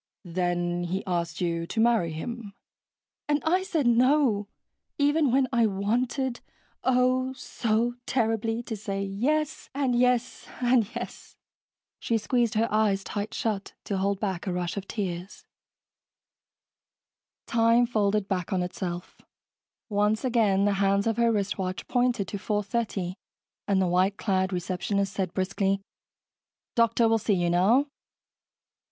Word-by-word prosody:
"Then 175 Hz, 0 st, -1 dB
he 185 Hz, +3 st, -3 dB
asked 170 Hz, -3 st, -2 dB
you 170 Hz, -1 st, -1 dB
to 225 Hz, -, -3 dB
marry 225 Hz, -7 st, +3 dB
him." 210 Hz, +6 st, -6 dB, 0.8 s
"And 295 Hz, 0 st, +3 dB
I 360 Hz, +4 st, +3 dB
said 335 Hz, -7 st, -1 dB
no, 240 Hz, -3 st, +3 dB, 0.5 s
even 290 Hz, 0 st, +3 dB
when 265 Hz, +1 st, +3 dB
I 235 Hz, -2 st, +4 dB
wanted, 240 Hz, +6 st, -1 dB, 0.4 s
oh, 255 Hz, 0 st, +2 dB
so 235 Hz, -2 st, -1 dB
terribly, 225 Hz, -1 st, 0 dB
to 230 Hz, -, -4 dB
say 200 Hz, -1 st, -3 dB
yes 285 Hz, +11 st, -1 dB
and 270 Hz, -3 st, +1 dB
yes 250 Hz, 0 st, +1 dB
and 245 Hz, -3 st, +3 dB
yes." -, -, -7 dB, 0.6 s
She 230 Hz, -, 0 dB
squeezed 235 Hz, 0 st, 0 dB
her 225 Hz, +2 st, +2 dB
eyes 205 Hz, -2 st, +2 dB
tight 205 Hz, +1 st, -4 dB
shut 210 Hz, -3 st, -2 dB
to 195 Hz, -2 st, -2 dB
hold 200 Hz, 0 st, 0 dB
back 195 Hz, -2 st, -3 dB
a -, -, 0 dB
rush 180 Hz, 0 st, -2 dB
of 200 Hz, -1 st, -5 dB
tears. 185 Hz, -2 st, -5 dB, 2.0 s
Time 230 Hz, +1 st, +4 dB
folded 210 Hz, -3 st, +1 dB
back 180 Hz, -4 st, -2 dB
on 185 Hz, -2 st, +1 dB
itself. 180 Hz, -1 st, -5 dB, 0.7 s
Once 210 Hz, +3 st, +1 dB
again, 210 Hz, -6 st, +3 dB
the 205 Hz, -, +3 dB
hands 200 Hz, 0 st, +2 dB
of 225 Hz, -1 st, 0 dB
her 235 Hz, -1 st, +3 dB
wristwatch 195 Hz, -3 st, -2 dB
pointed 245 Hz, -5 st, +1 dB
to 205 Hz, -, -3 dB
4:30 205 Hz, -2 st, -2 dB, 0.5 s
and 200 Hz, -2 st, +2 dB
the 190 Hz, -, +3 dB
white 185 Hz, +3 st, +2 dB
clad 190 Hz, -2 st, 0 dB
receptionist 190 Hz, +2 st, -1 dB
said 190 Hz, -2 st, -2 dB
briskly, 195 Hz, +1 st, 0 dB, 0.9 s
"Doctor 230 Hz, 0 st, +3 dB
will 225 Hz, 0 st, +3 dB
see 210 Hz, -1 st, +1 dB
you 175 Hz, -1 st, +1 dB
now." 210 Hz, +11 st, +4 dB
210 Hz, 135 wpm, -27 LUFS, 190-240 Hz, 2.0 s, I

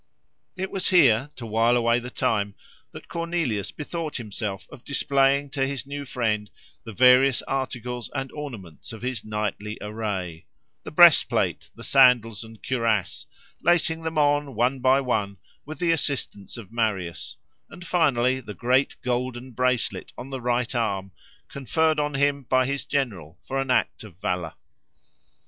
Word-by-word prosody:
It 185 Hz, +1 st, -4 dB
was 190 Hz, -, -2 dB
here, 140 Hz, -7 st, +5 dB
to 120 Hz, -, -8 dB
while 115 Hz, +2 st, +3 dB
away 115 Hz, 0 st, +2 dB
the 125 Hz, +1 st, -7 dB
time, 100 Hz, -4 st, -1 dB, 0.4 s
that -, -, -11 dB
Cornelius 165 Hz, -, -2 dB
bethought 155 Hz, -, -5 dB
himself 105 Hz, -3 st, -4 dB
of 140 Hz, -5 st, -12 dB
displaying 140 Hz, 0 st, +2 dB
to 135 Hz, -2 st, 0 dB
his 135 Hz, -1 st, -4 dB
new 140 Hz, +1 st, -6 dB
friend 105 Hz, -5 st, -1 dB, 0.3 s
the 115 Hz, -, -8 dB
various 125 Hz, +3 st, +5 dB
articles 125 Hz, -2 st, -4 dB
and 135 Hz, -1 st, -3 dB
ornaments 115 Hz, -, -8 dB
of 110 Hz, -, -10 dB
his 125 Hz, -4 st, -2 dB
knightly 105 Hz, 0 st, -3 dB
array—the 100 Hz, -6 st, -6 dB
breastplate, 170 Hz, +1 st, +5 dB
the -, -, -11 dB
sandals 120 Hz, -5 st, +4 dB
and 110 Hz, -1 st, -14 dB
cuirass, 115 Hz, -6 st, -1 dB, 0.3 s
lacing 165 Hz, -1 st, +2 dB
them 160 Hz, -1 st, -4 dB
on, 145 Hz, -2 st, +2 dB
one 125 Hz, +4 st, +1 dB
by 130 Hz, +2 st, +4 dB
one, 105 Hz, -6 st, -1 dB, 0.3 s
with 155 Hz, 0 st, -7 dB
the 170 Hz, +1 st, +1 dB
assistance 140 Hz, -10 st, -2 dB
of 115 Hz, -3 st, -10 dB
Marius, 105 Hz, -7 st, -2 dB, 0.3 s
and 175 Hz, -, -11 dB
finally 130 Hz, -7 st, +2 dB
the 105 Hz, -5 st, -9 dB
great 130 Hz, +3 st, +1 dB
golden 125 Hz, 0 st, -2 dB
bracelet 125 Hz, 0 st, -1 dB
on 135 Hz, +2 st, -8 dB
the 130 Hz, -1 st, -4 dB
right 120 Hz, 0 st, 0 dB
arm, 100 Hz, -5 st, -1 dB, 0.4 s
conferred 155 Hz, +4 st, 0 dB
on 150 Hz, -1 st, -1 dB
him 140 Hz, 0 st, +2 dB
by 130 Hz, 0 st, +3 dB
his 140 Hz, -1 st, -3 dB
general 95 Hz, -, -2 dB
for 135 Hz, 0 st, -2 dB
an 135 Hz, -, -5 dB
act 125 Hz, -, +1 dB
of 100 Hz, -6 st, -13 dB
valour. 90 Hz, -4 st, -3 dB
125 Hz, 150 wpm, -25 LUFS, 110-140 Hz, 0.4 s, here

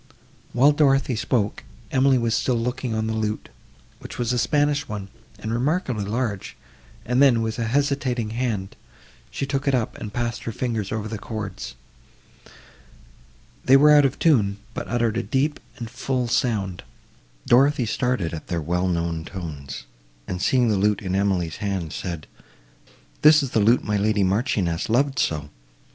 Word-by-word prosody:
While 140 Hz, +4 st, +5 dB
Dorothée 135 Hz, -3 st, +3 dB
spoke, 110 Hz, -2 st, -1 dB, 0.3 s
Emily 135 Hz, 0 st, +4 dB
was 115 Hz, -2 st, 0 dB
still 125 Hz, -, +1 dB
looking 125 Hz, 0 st, -2 dB
on 110 Hz, 0 st, -1 dB
the 110 Hz, -, -1 dB
lute, 110 Hz, -1 st, -2 dB, 0.5 s
which -, -, -9 dB
was 120 Hz, 0 st, 0 dB
a 125 Hz, -, +1 dB
Spanish 145 Hz, +2 st, +1 dB
one, 100 Hz, -2 st, -6 dB, 0.3 s
and 110 Hz, +2 st, -4 dB
remarkably 125 Hz, -, 0 dB
large; 110 Hz, -2 st, -3 dB, 0.5 s
and 125 Hz, +3 st, +2 dB
then, 120 Hz, -5 st, +5 dB
with 110 Hz, +1 st, -3 dB
a 115 Hz, -, 0 dB
hesitating 130 Hz, -3 st, 0 dB
hand, 110 Hz, -5 st, -2 dB, 0.5 s
she 140 Hz, -, -3 dB
took 135 Hz, 0 st, -2 dB
it 135 Hz, -, +4 dB
up, 120 Hz, -4 st, -1 dB
and 105 Hz, -, -6 dB
passed 120 Hz, +1 st, -3 dB
her 115 Hz, -, -2 dB
fingers 115 Hz, -4 st, -3 dB
over 110 Hz, -1 st, -2 dB
the 110 Hz, -1 st, -5 dB
chords. 110 Hz, -2 st, -6 dB, 1.9 s
They 135 Hz, +1 st, +7 dB
were 150 Hz, +2 st, +6 dB
out 145 Hz, -1 st, +7 dB
of 135 Hz, -1 st, +1 dB
tune, 105 Hz, -11 st, +3 dB, 0.2 s
but -, -, -5 dB
uttered 120 Hz, -2 st, 0 dB
a -, -, +1 dB
deep 140 Hz, +5 st, 0 dB, 0.2 s
and 120 Hz, -3 st, -5 dB
full 125 Hz, +1 st, -2 dB
sound. 105 Hz, -7 st, 0 dB, 0.7 s
Dorothée 135 Hz, 0 st, +4 dB
started 125 Hz, -8 st, -1 dB
at 80 Hz, -, -7 dB
their 85 Hz, -3 st, -1 dB
well 90 Hz, +4 st, -1 dB
known 85 Hz, -2 st, -1 dB
tones, 70 Hz, -9 st, -7 dB, 0.4 s
and, 90 Hz, 0 st, -4 dB
seeing 125 Hz, +2 st, +3 dB
the 105 Hz, -, +2 dB
lute 105 Hz, +1 st, +1 dB
in 95 Hz, -1 st, -2 dB
Emily's 95 Hz, -5 st, 0 dB
hand, 95 Hz, -6 st, -3 dB
said, 85 Hz, -5 st, -5 dB, 1.0 s
"This 150 Hz, 0 st, +7 dB
is 135 Hz, -, -4 dB
the 110 Hz, -, +2 dB
lute 115 Hz, +4 st, +4 dB
my 105 Hz, 0 st, 0 dB
lady 105 Hz, 0 st, +2 dB
Marchioness 95 Hz, -4 st, 0 dB
loved 135 Hz, +3 st, +2 dB
so! 75 Hz, -2 st, -1 dB
115 Hz, 165 wpm, -23 LUFS, 100-130 Hz, 1.9 s, They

